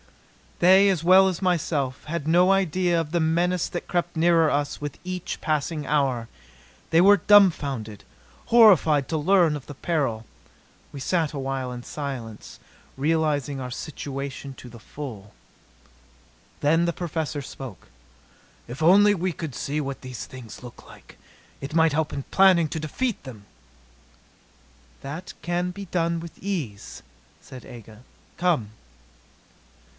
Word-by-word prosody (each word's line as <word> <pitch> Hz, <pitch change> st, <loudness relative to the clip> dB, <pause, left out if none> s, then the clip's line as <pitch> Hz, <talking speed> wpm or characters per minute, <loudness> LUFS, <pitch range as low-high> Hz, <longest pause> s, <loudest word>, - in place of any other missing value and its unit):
They 190 Hz, +3 st, +6 dB
as 180 Hz, -5 st, 0 dB
well 190 Hz, +2 st, +6 dB
as 185 Hz, -1 st, -3 dB
myself, 150 Hz, -7 st, -1 dB
had 170 Hz, +2 st, -3 dB
had -, -, -9 dB
no 175 Hz, +3 st, +4 dB
idea 180 Hz, -2 st, +1 dB
of 155 Hz, -2 st, -4 dB
the 170 Hz, -, +1 dB
menace 170 Hz, +2 st, +1 dB
that 175 Hz, -, -6 dB
crept 175 Hz, -1 st, -2 dB
nearer 165 Hz, -1 st, +4 dB
us 145 Hz, 0 st, -2 dB
with 145 Hz, -2 st, -5 dB
each 185 Hz, -1 st, -5 dB
passing 155 Hz, 0 st, -1 dB
hour. 135 Hz, -6 st, 0 dB, 0.6 s
They 165 Hz, +1 st, +4 dB
were 200 Hz, +2 st, +7 dB
dumbfounded, 140 Hz, -, +3 dB, 0.4 s
horrified 185 Hz, -, +5 dB
to 160 Hz, -, -1 dB
learn 170 Hz, 0 st, +3 dB
of 145 Hz, -, -8 dB
the 145 Hz, -, -9 dB
peril. 135 Hz, -9 st, -2 dB, 0.7 s
We 140 Hz, -, -8 dB
sat 160 Hz, +2 st, 0 dB
awhile 135 Hz, -2 st, -3 dB
in 125 Hz, -1 st, -7 dB
silence, 125 Hz, -8 st, -7 dB, 0.4 s
realizing 145 Hz, -2 st, 0 dB
our 125 Hz, -1 st, -5 dB
situation 140 Hz, 0 st, -6 dB
to 125 Hz, -, -12 dB
the 115 Hz, 0 st, -13 dB
full. 110 Hz, -6 st, -9 dB, 1.3 s
Then 165 Hz, +4 st, +3 dB
the 170 Hz, -, 0 dB
Professor 160 Hz, -4 st, -3 dB
spoke: 130 Hz, -5 st, -10 dB, 0.8 s
"If 125 Hz, +6 st, -8 dB
only 205 Hz, +5 st, +6 dB
we 185 Hz, -1 st, -1 dB
could 155 Hz, -4 st, -6 dB
see 150 Hz, +2 st, -2 dB
what 140 Hz, -1 st, -5 dB
these 130 Hz, -3 st, -7 dB
things 125 Hz, -5 st, -11 dB
look 120 Hz, -1 st, -12 dB
like! -, -, -16 dB, 0.4 s
It 140 Hz, +3 st, -7 dB
might 160 Hz, -2 st, +4 dB
help 155 Hz, 0 st, 0 dB
in 140 Hz, -, -4 dB
planning 185 Hz, -4 st, +5 dB
to 160 Hz, -, -4 dB
defeat 220 Hz, -, -3 dB
them." 115 Hz, -7 st, -11 dB, 1.6 s
"That 155 Hz, +7 st, -7 dB
can 175 Hz, +1 st, -1 dB
be 200 Hz, +2 st, -7 dB
done 170 Hz, -1 st, -1 dB
with 165 Hz, 0 st, -10 dB
ease," 125 Hz, -, -5 dB, 0.4 s
said 130 Hz, -1 st, -12 dB
Aga. 110 Hz, -2 st, -12 dB, 0.4 s
"Come." 165 Hz, -12 st, 0 dB
155 Hz, 140 wpm, -24 LUFS, 135-175 Hz, 1.6 s, were